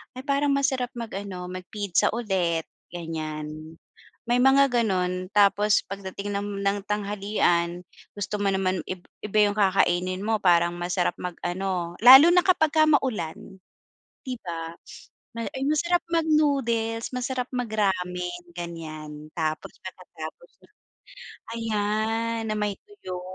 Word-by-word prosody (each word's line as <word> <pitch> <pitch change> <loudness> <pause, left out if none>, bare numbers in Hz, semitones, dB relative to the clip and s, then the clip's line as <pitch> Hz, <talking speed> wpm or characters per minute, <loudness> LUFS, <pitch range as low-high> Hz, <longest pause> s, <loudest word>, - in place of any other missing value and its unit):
“Ay 255 - -7
parang 280 +1 +2
masarap 265 -3 0
mag-ano, 200 -6 -6
mag-pizza 185 0 -1
ulit.” 185 -8 -1 0.2
Ganiyan, 155 -2 -6 0.5
may 245 - +4
mga 275 +1 +5
gano’n, 185 -6 0
tapos 205 0 +4
pagdating 200 +1 -5
ng 200 -1 -4
ng 200 +1 +2
tanghalian 200 -4 0 0.3
gusto 205 0 -3
mo - - 0
naman 190 -1 0
ib 185 -1 -6 0.2
iba 215 +1 0
yung 205 - -5
kakainin 185 -2 +2
mo. 220 +1 +1
Parang 175 -1 +4
masarap 175 +1 0
mag-ano, 180 0 -3
lalo 265 +5 +11
na 360 0 +5
kapagka 315 -4 +4
maulan, 205 - -1 0.7
‘di 255 -1 -4
ba. 165 -2 -5 0.6
May 230 - -3
ay, 265 - -4
masarap 340 +4 +2
mag-noodles 275 -9 +1
masarap 250 0 -2
mag-ramen 180 -6 -1
ganiyan. 155 -3 -7
Tapos 155 -2 -2
pagkatapos - - -9 0.2
no’n, - - -24 0.8
ayan 225 +1 -1
na 215 - -1
may 205 -1 -1
tuyo. 185 - -8
200 Hz, 120 wpm, -25 LUFS, 180-235 Hz, 0.8 s, lalo